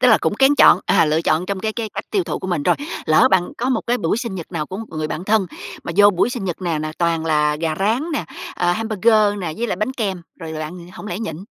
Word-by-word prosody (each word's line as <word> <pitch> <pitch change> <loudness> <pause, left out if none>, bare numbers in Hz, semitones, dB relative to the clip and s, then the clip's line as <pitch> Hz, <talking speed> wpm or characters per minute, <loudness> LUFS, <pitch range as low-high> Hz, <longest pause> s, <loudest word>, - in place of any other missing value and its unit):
tức 250 - +5
là 220 - +6
cũng - - 0
kén 270 +5 +4
chọn, 190 -9 +6
à, - - +4
lựa 155 +1 +1
chọn 165 +3 +1
trong 195 -1 -3
cái 220 +1 -2
cái 225 -1 -4
cách - - -4
tiêu 390 -4 +1
thụ - - -3
của - - -6
mình. 175 -6 -1
Rồi, - - +3 0.3
lỡ 155 - +5
bạn 185 -2 +2
có 245 +2 -1
một 255 -4 +1
cái 245 +1 +1
buổi 165 +1 0
sinh 235 -6 -4
nhật 175 -1 -8
nào 155 -3 -2
của 185 - -6
một 225 +2 -6
người 155 -1 -3
bạn 170 +4 -4
thân, 210 -2 +2 0.4
mà - - -4
vô 205 0 +7
buổi 190 +5 +1
sinh 245 -5 -4
nhật 180 0 -4
nè 170 -3 -1
nà 155 0 -4
toàn 165 -2 +1
là 150 -1 +2
gà 160 0 -1
rán 220 +7 +1
nè, 290 - -1 0.3
ờ, 175 0 +1
hamburger 215 0 +2
nè, 170 -4 -3
với 235 - -1
lại 195 - -2
bánh 215 +7 -1
kem, 195 -8 -3 0.2
rồi 160 -2 -6
là 155 - -5
bạn 170 +3 -7
hổng 210 - -9
lẽ 180 0 -4
nhịn? 165 -9 -4
185 Hz, 290 wpm, -20 LUFS, 165-220 Hz, 0.4 s, vô